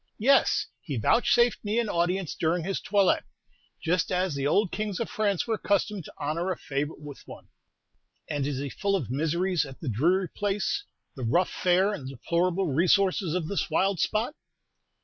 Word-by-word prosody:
"Yes; 270 +6 +4 0.2
he 140 -6 -4
vouchsafed 240 - +3
me 210 +2 -1
an 235 -2 +1
audience 180 -1 0
during 165 +1 0
his 195 +3 -2
toilet, 200 -2 +2 0.6
just 170 +1 +1
as 180 -2 +1
the 140 0 -1
old 200 +5 +2
kings 210 -2 -3
of 230 - -3
France 205 -4 0
were 230 - -1
accustomed 205 -3 0
to - - -11
honor 160 +5 -2
a 185 - -1
favorite 145 +2 -3
with 145 -2 -10
one." - - -12 0.8
"And 145 -2 -1
is 145 -3 -2
he 140 +1 -3
full 200 +7 -1
of 140 - -3
miseries 165 +5 +1
at 135 -2 -10
the 150 - -4
dreary 175 - +2
place, 205 - -1 0.3
the 135 - -8
rough 170 +11 +2
fare 185 +3 +2
and 130 -9 -6
deplorable 175 +7 0
resources 185 +2 +2
of 175 -4 -1
this 200 - -2
wild 195 -2 +1
spot?" 225 - 0
180 Hz, 175 wpm, -27 LUFS, 150-200 Hz, 0.8 s, Yes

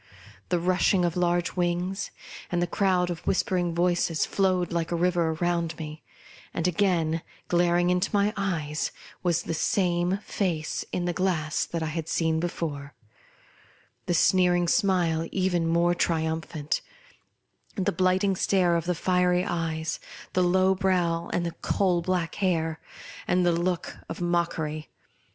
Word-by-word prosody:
The 180 - +2
rush 185 +3 +2
ing 180 -2 +3
of 170 - -1
large 175 0 +1
wings, 180 +2 -1 0.4
and 175 - +1
the 175 - +2
crowd 180 -1 +1
of 170 - -4
whisper 190 0 +1
ing 175 -2 0
voices 175 -2 +1
flowed 185 -3 +1
like 170 -1 -1
a - - +1
river 170 -1 +1
round 170 -1 -1
me; 155 -1 -7 0.5
and 170 - 0
again, 170 -3 +1 0.3
glaring 175 0 +3
into 180 +2 +1
my 205 0 +2
eyes, 160 -7 -2 0.3
was 175 -2 +1
the - - -3
same 175 +2 +1
face 165 -6 -2
in 175 - -1
the 175 - 0
glass 170 -4 0
that 165 -1 -3
I 155 -1 -3
had 165 -1 -4
seen 160 -1 +1
before, 150 -4 -4 1.1
the 175 - +1
sneering 175 0 +3
smile 170 -4 +2
even 180 -3 +1
more 170 +1 +3
triumphant, 160 -3 -1 0.9
the 190 -3 0
blighting 185 +2 +2
stare 180 -2 +2
of 165 - -3
the 180 0 0
fiery 180 +1 +2
eyes, 160 -3 -2 0.3
the 185 - +2
low 185 +1 +4
brow 180 -3 0
and 175 - 0
the 170 - -2
coal 180 -3 +1
black 175 -1 -1
hair, 165 -4 0 0.5
and 180 0 +2
the 175 - +4
look 175 +1 -1
of 165 - -5
mock 175 -1 0
ery. 155 -1 -4
175 Hz, 150 wpm, -26 LUFS, 165-180 Hz, 1.1 s, low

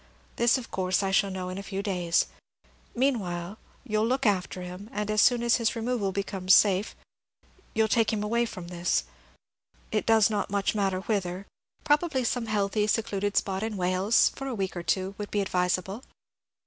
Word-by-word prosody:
This, 235 +2 +4
of 245 -3 -8
course, 185 0 0
I 195 - 0
shall 200 +1 +3
know 185 -1 -4
in 185 +1 -5
a - - -4
few 195 0 -5
days. 180 -4 +1 0.7
Meanwhile 205 -7 -1 0.2
you 215 -5 -1
'll 220 - +2
look 260 +2 0
after 185 -3 0
him, 180 +4 -8
and 210 0 -2
as 215 0 +3
soon 240 -1 +4
as 235 -1 +4
his 230 -2 0
removal 230 -3 -1
becomes 190 -1 +2
safe 200 0 +3 0.8
you 220 0 +4
'll - - -1
take 220 0 +2
him 210 -2 -1
away 235 +3 +1
from 180 -5 -8
this, 175 - 0 0.9
it - - -1
does 225 -2 +5
not 210 -2 -2
much 200 0 0
matter 195 -3 0
whither; 190 -2 -2 0.4
probably 295 -3 +2
some 235 0 -1
healthy, 210 0 0
secluded 205 -2 0
spot 190 -1 0
in 220 -1 -3
Wales, 185 +4 +3
for 270 - -6
a 260 - -3
week 190 -3 -3
or 175 - -3
two, 190 +2 -1
would 205 - -4
be 205 - -1
advisable. 185 +2 -1
205 Hz, 185 wpm, -27 LUFS, 185-225 Hz, 0.9 s, does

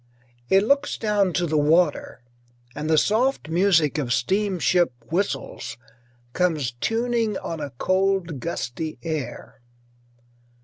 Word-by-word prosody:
It 195 +1 +5
looks 280 +5 +1
down 205 -4 +1
to 175 +3 +1
the 155 -2 +1
water, 150 -3 +1 0.5
and 150 +1 -4
the 160 - +4
soft 225 - +1
music 165 -4 +3
of 130 -4 -2
steamship 180 +3 +1 0.2
whistles 165 -10 -2 0.6
comes 160 -8 0
tuning 225 - -1
on 165 - -5
a 145 -2 -4
cold, 185 -4 0
gusty 155 0 -4
air. 155 -4 -5
175 Hz, 115 wpm, -24 LUFS, 150-200 Hz, 0.6 s, It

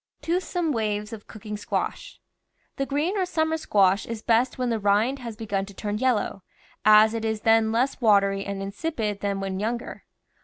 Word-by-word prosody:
TOOTHSOME 345 -1 -1
WAYS 210 -3 -2
OF 215 -2 -9
COOKING 210 -1 -7
SQUASH 205 - -4 0.6
The 275 - -1
green 300 +8 0
or 380 -2 +1
summer 320 -2 0
squash 200 -10 +2
is 230 -1 -6
best 240 +2 +2
when 250 -2 -1
the 225 - 0
rind 210 +7 +2
has 235 -3 -7
begun 205 -3 -2
to 200 - -12
turn 210 +1 -3
yellow, 240 -6 0 0.4
as 215 +1 +7
it 225 -1 -3
is 220 -1 -1
then 225 0 +4
less 255 +4 0
watery 200 -3 +3
and 200 -1 -4
insipid 210 -1 -3
than 200 -1 -2
when 190 -1 -3
younger. 230 +3 -4
220 Hz, 180 wpm, -25 LUFS, 205-255 Hz, 0.6 s, as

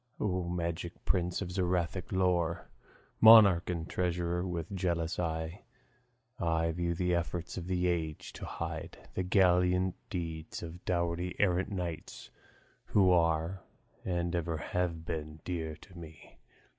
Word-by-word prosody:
Of 90 -4 -1
magic 85 0 -4
prince, 90 +1 0
of 90 - -6
Zoroastric 90 -1 -1
lore 90 -3 +1 0.5
Monarch 105 -6 +8
and 85 -2 -2
treasurer, 90 0 -1
with 85 -1 -4
jealous 85 -3 -1
eye 80 +1 -2 0.8
I 80 0 +1
view 85 +1 -1
the 90 +1 +1
efforts 85 0 -2
of 90 -2 -5
the 90 -1 0
age 80 -4 -2
to - - -7
hide - - -5 0.2
The - - -1
gallant 90 -1 +3 0.2
deeds 80 -3 -5
of 85 +2 -8
doughty 85 0 -1
errant 95 -2 +2
knights, 85 -5 -5 0.5
Who 95 -3 +4
are, 85 +1 +2 0.4
and 85 -1 -1
ever 85 -1 -1
have 85 0 -2
been, 75 -1 -5
dear 80 -3 -3
to 90 +2 -16
me. 80 -2 -12
85 Hz, 130 wpm, -32 LUFS, 85-90 Hz, 0.8 s, Monarch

